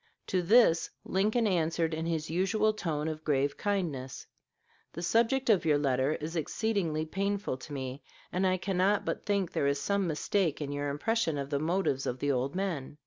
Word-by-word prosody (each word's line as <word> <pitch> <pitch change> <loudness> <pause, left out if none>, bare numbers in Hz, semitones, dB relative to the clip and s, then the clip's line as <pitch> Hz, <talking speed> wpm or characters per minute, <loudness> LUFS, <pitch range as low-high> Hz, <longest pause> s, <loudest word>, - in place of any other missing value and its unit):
To 185 - 0
this 175 -3 +5 0.2
Lincoln 215 +5 +1
answered 165 -3 +1
in 160 +1 -2
his 160 -2 -1
usual 195 +6 +1
tone 160 -7 -2
of 155 0 -4
grave 140 -2 +1
kindness: 160 -11 -2 0.7
"The 170 - -6
subject 235 +8 +2
of 210 -6 +4
your 155 -3 +3
letter 135 0 +1
is 160 +3 -5
exceedingly 165 -2 -1
painful 200 -1 -2
to 130 - -11
me; 135 0 -5 0.3
and 190 +1 +1
I 185 0 +2
cannot 190 +2 +1
but - - -3
think 200 -4 +1
there 140 - 0
is 140 0 +1
some 200 +1 0
mistake 165 +1 0
in 145 -2 -4
your 145 0 -2
impression 165 +2 0
of 140 +1 -4
the 140 - +1
motives 160 -4 0
of 125 - -2
the 145 +2 0
old 135 +3 -1
men. 170 -8 -3
165 Hz, 185 wpm, -30 LUFS, 145-195 Hz, 0.7 s, this